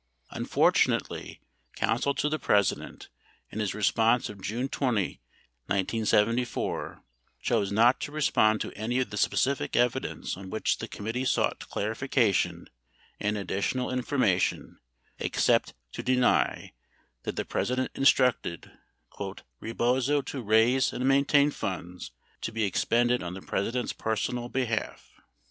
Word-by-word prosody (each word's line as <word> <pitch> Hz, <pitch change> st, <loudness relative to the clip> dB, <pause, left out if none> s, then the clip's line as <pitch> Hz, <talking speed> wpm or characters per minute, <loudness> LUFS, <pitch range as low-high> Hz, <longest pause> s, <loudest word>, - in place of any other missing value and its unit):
2 -, -, -6 dB
Unfortunately, -, -, +1 dB, 0.3 s
counsel 140 Hz, 0 st, 0 dB
to -, -, 0 dB
the 155 Hz, +1 st, -1 dB
President, 100 Hz, -2 st, 0 dB, 0.4 s
in 110 Hz, -, -5 dB
his 105 Hz, -3 st, -1 dB
response 115 Hz, +3 st, +2 dB
of 100 Hz, -2 st, -10 dB
June 115 Hz, +8 st, -2 dB
20, 120 Hz, -9 st, -1 dB, 0.5 s
1974, 110 Hz, +4 st, 0 dB, 0.4 s
chose 100 Hz, -1 st, 0 dB
not 115 Hz, +5 st, +4 dB
to 145 Hz, -, -5 dB
respond 110 Hz, -8 st, +3 dB
to -, -, -4 dB
any 110 Hz, +4 st, -2 dB
of 130 Hz, -, -1 dB
the -, -, -5 dB
specific 135 Hz, +5 st, +1 dB
evidence 120 Hz, -1 st, 0 dB
on 95 Hz, +1 st, -9 dB
which 110 Hz, -, 0 dB
the -, -, -5 dB
committee 115 Hz, +5 st, -4 dB
sought 130 Hz, -, 0 dB
clarification 115 Hz, 0 st, 0 dB, 0.5 s
and 105 Hz, 0 st, 0 dB
additional 100 Hz, +5 st, -1 dB
informa 125 Hz, -7 st, +1 dB
tion -, -, -2 dB, 0.4 s
except -, -, +1 dB, 0.2 s
to -, -, -5 dB
deny 125 Hz, -1 st, +1 dB, 0.5 s
that -, -, -4 dB
the -, -, -2 dB
President 130 Hz, +1 st, -1 dB
instructed 125 Hz, -, +2 dB, 0.9 s
"Rebozo 130 Hz, +5 st, +1 dB
to 135 Hz, -, -5 dB
raise 115 Hz, +4 st, +3 dB
and 125 Hz, -, -2 dB
maintain 140 Hz, +1 st, +4 dB
funds 90 Hz, -, -5 dB, 0.3 s
to -, -, -3 dB
be 110 Hz, 0 st, -1 dB
expended 120 Hz, +5 st, +2 dB
on 90 Hz, 0 st, -5 dB
the 95 Hz, -, -8 dB
President's 120 Hz, +5 st, -2 dB
personal 120 Hz, +2 st, -2 dB
behalf." 120 Hz, -4 st, -3 dB
115 Hz, 125 wpm, -28 LUFS, 105-130 Hz, 0.9 s, not